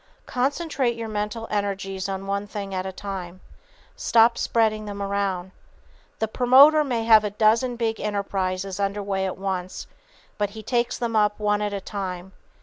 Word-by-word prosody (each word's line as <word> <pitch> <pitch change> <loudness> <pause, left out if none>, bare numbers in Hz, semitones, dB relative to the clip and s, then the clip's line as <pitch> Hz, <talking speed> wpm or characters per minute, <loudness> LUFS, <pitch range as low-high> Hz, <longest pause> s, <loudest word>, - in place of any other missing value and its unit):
Concentrate 270 -1 -1
your 230 -1 -5
mental 210 +2 -3
energies 195 -2 -2
on 195 0 -4
one 200 +1 -2
thing 200 -1 -6
at 185 0 -2
a - - -4
time. 185 -2 -7 0.6
Stop 230 +1 +4
spreading 215 -2 +1
them 205 -1 -6
around. 195 -2 -2 0.7
The 220 - -1
promoter 265 +7 +6
may 240 -5 -1
have 220 -1 +6
a 210 - -1
dozen 225 +4 +2
big 225 -2 -1
enterprises 195 -2 -2
under 200 +1 -1
way 195 -1 -1
at 185 - -5
once, 185 -1 -4 0.5
but 205 -1 +1
he 220 +1 -10
takes 240 +1 0
them 235 -2 -2
up 210 -1 +2
one 210 0 +1
at 210 0 -1
a 200 -1 -4
time. 190 -2 -5
205 Hz, 165 wpm, -24 LUFS, 195-225 Hz, 0.7 s, promoter